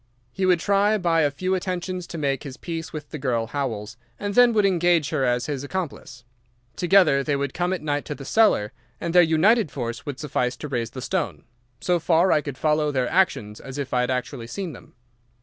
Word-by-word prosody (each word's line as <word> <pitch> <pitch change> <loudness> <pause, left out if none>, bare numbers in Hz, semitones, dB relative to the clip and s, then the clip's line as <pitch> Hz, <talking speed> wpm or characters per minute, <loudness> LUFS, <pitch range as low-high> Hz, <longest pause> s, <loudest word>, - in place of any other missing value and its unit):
He 190 +5 -1
would 180 -2 +4
try 200 +4 +2
by 170 -4 +2
a 145 - +3
few 185 +7 -2
attentions 185 -1 -3
to 170 - -7
make 140 -4 -1
his 135 -1 -8
peace 165 -2 -5
with 150 -2 -7
the 155 - -5
girl 120 -4 0
Howells, 115 -6 -4 0.2
and 205 0 -3
then 245 +2 +6
would 210 -2 +3
engage 175 -4 +2
her 150 -4 0
as 125 -1 +1
his 140 -2 -3
accomplice. 145 -7 -5 0.5
Together 175 -7 +4
they 145 0 0
would 140 -1 -2
come 175 +1 -1
at 185 -4 -3
night 145 -1 -1
to 150 - -5
the 135 - -10
cellar, 200 - +3 0.3
and 170 - -3
their 180 - +8
united 175 +5 +3
force 120 -4 -5
would 140 -3 -6
suffice 130 -4 -1
to 150 - -6
raise 120 -5 -2
the 130 +2 -8
stone. 185 -1 -2 0.4
So 175 -1 +1
far 170 +3 +3
I 150 - +4
could 145 -3 -6
follow 150 0 +1
their 130 -3 0
actions 110 - +1
as 135 +1 -8
if 140 -2 -4
I 125 - +3
had 125 - -1
actually 125 -2 -3
seen 180 +4 -5
them. - - -15
150 Hz, 220 wpm, -24 LUFS, 135-180 Hz, 0.5 s, their